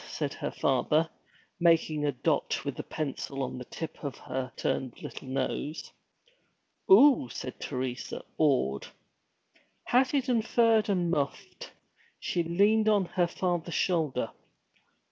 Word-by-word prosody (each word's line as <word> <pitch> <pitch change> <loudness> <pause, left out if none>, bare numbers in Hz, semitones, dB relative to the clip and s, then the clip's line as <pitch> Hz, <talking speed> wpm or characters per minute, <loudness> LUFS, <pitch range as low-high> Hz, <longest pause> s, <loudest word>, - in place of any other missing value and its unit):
said - - -3
her - - -4
father, 150 +5 +1 0.5
making 165 -3 +3
a 145 - +2
dot 125 - -1
with - - -3
the - - -4
pencil 140 -2 -4
on 125 0 -4
the 125 - -7
tip 160 +4 -7
of 140 -2 -4
her 130 0 -4
upturned 130 0 -3
little - - -8
nose. 135 +4 -3 1.0
'Oo!' 240 - +7
said 130 +2 -7
Teresa, 125 -2 -4 0.2
awed. 130 - +2 1.0
Hatted, 255 -2 +2
furred, 225 -2 +3
and 180 -4 +1
muffed, 140 -4 -3 0.5
she 175 - -1
leaned 205 +6 +3
on 205 -3 +3
her 175 0 +1
father's 175 -2 -2
shoulder. 155 -10 0
160 Hz, 125 wpm, -29 LUFS, 135-200 Hz, 1.0 s, Oo